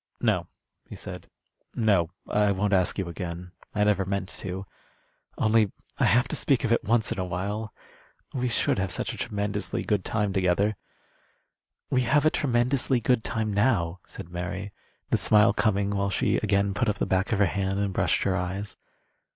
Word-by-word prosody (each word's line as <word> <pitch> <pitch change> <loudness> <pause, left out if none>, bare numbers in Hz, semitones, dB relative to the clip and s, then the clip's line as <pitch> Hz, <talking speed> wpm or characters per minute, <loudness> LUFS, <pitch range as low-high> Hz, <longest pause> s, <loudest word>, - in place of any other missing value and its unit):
"No," - - +1 0.4
he - - -7
said. - - -8 0.5
"No. 100 -8 +2 0.2
I 105 -1 +2
won't 100 +1 0
ask 90 -2 +2
you 95 -3 -2
again. 85 0 -6 0.2
I 105 - +3
never 105 -2 +3
meant 95 0 -3
to. 95 +1 -5 0.7
Only 110 -2 +3 0.3
I - - +4
have 125 +4 +4
to - - -2
speak 135 -2 +2
of 115 - 0
it 115 - +3
once 115 0 +1
in - - -2
a - - 0
while. 100 +5 -3 0.6
We 125 -1 -1
should 115 - +2
have 95 -1 -1
such - - -2
a - - -8
tremendously 105 0 -2
good 105 -3 0
time 105 -3 -1
together." 95 +3 +2 1.2
"We 130 - +3
have 145 +5 +2
a 155 - +5
tremendously 125 0 +1
good 120 0 +2
time 110 -2 -2
now," 100 -6 +1
said 95 -4 -9
Mary, 90 +3 -5 0.4
the - - +4
smile 105 0 +5
coming 100 -2 +1
while 100 0 0
she - - +1
again 100 0 +1
put 120 +2 0
up 105 - -1
the - - 0
back 95 +4 0
of 110 - +2
her 100 - +4
hand 95 +1 -1
and 100 -1 -1
brushed - - +1
her 95 - +1
eyes. 95 +3 -3
100 Hz, 185 wpm, -27 LUFS, 95-110 Hz, 1.2 s, a